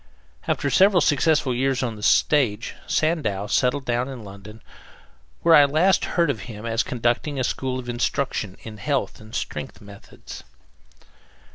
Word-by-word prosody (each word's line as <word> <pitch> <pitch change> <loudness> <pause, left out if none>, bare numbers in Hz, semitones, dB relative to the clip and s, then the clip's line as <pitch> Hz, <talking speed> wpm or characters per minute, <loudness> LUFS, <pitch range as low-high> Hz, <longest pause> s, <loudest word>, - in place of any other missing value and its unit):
After 140 - 0
several 190 +6 +5
successful 150 -3 +2
years 130 +1 0
on 115 -3 -3
the 105 - -11
stage, 120 -2 +2
Sandow 145 - 0
settled 130 +5 0
down 120 +1 -1
in 130 -4 -8
London, 100 +2 -12 0.8
where 165 - +5
I 145 -3 +8
last 165 +7 +2
heard 170 -4 +3
of 115 - -6
him 105 0 -8
as 115 0 0
conducting 125 +3 -1
a - - 0
school 130 +1 -2
of 125 -1 -7
instruction 120 -4 -2
in 110 -1 -9
health 135 +1 -2
and 110 +2 -11
strength 75 +6 -5
methods. 100 -1 -12
125 Hz, 150 wpm, -23 LUFS, 110-145 Hz, 0.8 s, I